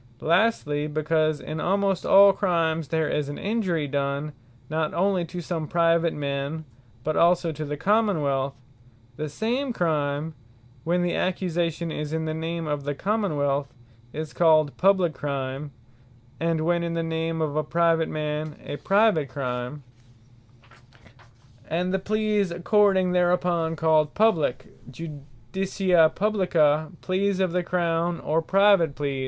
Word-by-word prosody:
Publique 155 Hz, -, -6 dB
Crimes -, -, +2 dB
What -, -, +7 dB
Lastly, 150 Hz, -9 st, +1 dB
because 155 Hz, 0 st, 0 dB
in 155 Hz, +1 st, -5 dB
almost 195 Hz, +2 st, 0 dB
all 200 Hz, 0 st, +7 dB
Crimes 165 Hz, -5 st, 0 dB
there 160 Hz, 0 st, 0 dB
is 145 Hz, -1 st, -2 dB
an 145 Hz, -, -6 dB
Injury 190 Hz, -8 st, -1 dB
done, 140 Hz, +1 st, -2 dB, 0.4 s
not 155 Hz, 0 st, -2 dB
onely 185 Hz, -1 st, +1 dB
to 175 Hz, +1 st, -7 dB
some 165 Hz, -2 st, -4 dB
Private 170 Hz, 0 st, +2 dB
man, 140 Hz, +2 st, -3 dB, 0.4 s
but 155 Hz, +2 st, -1 dB
also 170 Hz, 0 st, +3 dB
to 155 Hz, 0 st, -6 dB
the 150 Hz, 0 st, -4 dB
Common 205 Hz, -2 st, +2 dB
wealth; 135 Hz, -1 st, -1 dB, 0.6 s
the 155 Hz, 0 st, -4 dB
same 245 Hz, -, -2 dB
Crime, 155 Hz, -5 st, -1 dB, 0.5 s
when 175 Hz, +3 st, +1 dB
the 175 Hz, -, 0 dB
accusation 170 Hz, -2 st, -1 dB
is 150 Hz, 0 st, -4 dB
in 160 Hz, 0 st, -1 dB
the 155 Hz, -, -2 dB
name 165 Hz, +1 st, -4 dB
of 145 Hz, -2 st, -3 dB
the 145 Hz, 0 st, -3 dB
Common 200 Hz, -2 st, -1 dB
wealth, 140 Hz, -1 st, -1 dB, 0.4 s
is 155 Hz, +1 st, -6 dB
called 155 Hz, -4 st, +3 dB
Publique 185 Hz, -4 st, +3 dB
Crime; 140 Hz, 0 st, -4 dB, 0.7 s
and 165 Hz, -1 st, 0 dB
when 170 Hz, +1 st, +1 dB
in 170 Hz, 0 st, -3 dB
the 165 Hz, -, -1 dB
name 165 Hz, 0 st, -2 dB
of 155 Hz, -2 st, -1 dB
a 155 Hz, -, +1 dB
Private 165 Hz, +1 st, +1 dB
man, 150 Hz, 0 st, -3 dB
a 145 Hz, -, -5 dB
Private 195 Hz, -8 st, +2 dB
Crime; 125 Hz, +1 st, -4 dB, 1.9 s
And 180 Hz, +3 st, -1 dB
the 190 Hz, -, +1 dB
Pleas 210 Hz, -1 st, 0 dB
according 190 Hz, +1 st, +2 dB
thereunto 175 Hz, -2 st, +1 dB
called 155 Hz, -2 st, +2 dB
Publique, 205 Hz, -, +2 dB, 0.2 s
Judicia 160 Hz, -, 0 dB
Publica, 170 Hz, -7 st, +1 dB
Pleas 190 Hz, +1 st, 0 dB
of 185 Hz, -2 st, +1 dB
the 180 Hz, +1 st, 0 dB
Crown; 170 Hz, -1 st, -1 dB
or 160 Hz, +2 st, 0 dB
Private 195 Hz, -4 st, +3 dB
Pleas. 140 Hz, -2 st, -2 dB
165 Hz, 150 wpm, -25 LUFS, 150-180 Hz, 1.9 s, What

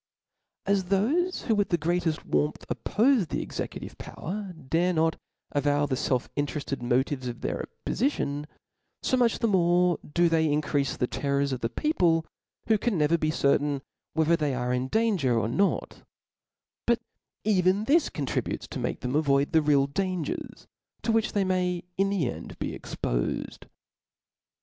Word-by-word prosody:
As 200 Hz, -2 st, +2 dB
thofe 270 Hz, -, +1 dB
who 225 Hz, -, +1 dB
with 205 Hz, -1 st, +1 dB
the 175 Hz, -, +2 dB
greateft 165 Hz, 0 st, 0 dB
warmth 150 Hz, -, 0 dB
oppofe 235 Hz, -, +2 dB
the -, -, -2 dB
executive -, -, -6 dB
power, 195 Hz, +2 st, -5 dB
dare 165 Hz, +3 st, 0 dB
not 160 Hz, 0 st, +2 dB, 0.4 s
avow 145 Hz, 0 st, +2 dB
the 140 Hz, -, -2 dB
felf 130 Hz, -1 st, 0 dB
in* 145 Hz, 0 st, +1 dB
terefted 140 Hz, -3 st, -4 dB
motives 130 Hz, +2 st, 0 dB
of 120 Hz, -1 st, -6 dB
their -, -, -2 dB, 0.2 s
oppoficion, 150 Hz, -, 0 dB, 0.6 s
fo 260 Hz, -, +2 dB
much 240 Hz, -2 st, +3 dB
the 230 Hz, -, +1 dB
more 180 Hz, -3 st, +3 dB
do 175 Hz, +2 st, +4 dB
they 160 Hz, -1 st, +3 dB
increafe 145 Hz, -2 st, 0 dB
the -, -, +1 dB
terrors 140 Hz, +2 st, 0 dB
of 130 Hz, -, -2 dB
the 115 Hz, -, -1 dB
people, 170 Hz, -, +2 dB, 0.4 s
who 220 Hz, -1 st, +3 dB
can 225 Hz, -3 st, 0 dB
never 150 Hz, +2 st, +3 dB
be 155 Hz, -2 st, 0 dB
certain 140 Hz, -1 st, +1 dB, 0.3 s
whether 160 Hz, +1 st, +3 dB
they 150 Hz, -5 st, 0 dB
are 125 Hz, 0 st, -1 dB
in 125 Hz, +1 st, 0 dB
dan* 220 Hz, +5 st, +2 dB
ger 125 Hz, -5 st, +2 dB
or 110 Hz, -, +1 dB
not« 195 Hz, -, 0 dB, 0.9 s
But 235 Hz, 0 st, +4 dB, 0.5 s
even 190 Hz, -1 st, +3 dB
this 300 Hz, +7 st, +3 dB
contributes 140 Hz, -3 st, -2 dB
to -, -, -5 dB
make -, -, -3 dB
them 125 Hz, -, -2 dB
avoid 140 Hz, -2 st, +2 dB
the 160 Hz, -, +5 dB
real 145 Hz, -2 st, +3 dB
dai^ers, 180 Hz, +1 st, -3 dB, 0.4 s
to 230 Hz, -, +1 dB
which 225 Hz, 0 st, +1 dB
they 200 Hz, -2 st, +2 dB
may, 180 Hz, -2 st, 0 dB, 0.2 s
in 195 Hz, 0 st, +3 dB
the 190 Hz, -9 st, +1 dB
end, -, -, -6 dB
be -, -, -3 dB
expofed. -, -, -3 dB
160 Hz, 165 wpm, -27 LUFS, 140-195 Hz, 0.9 s, the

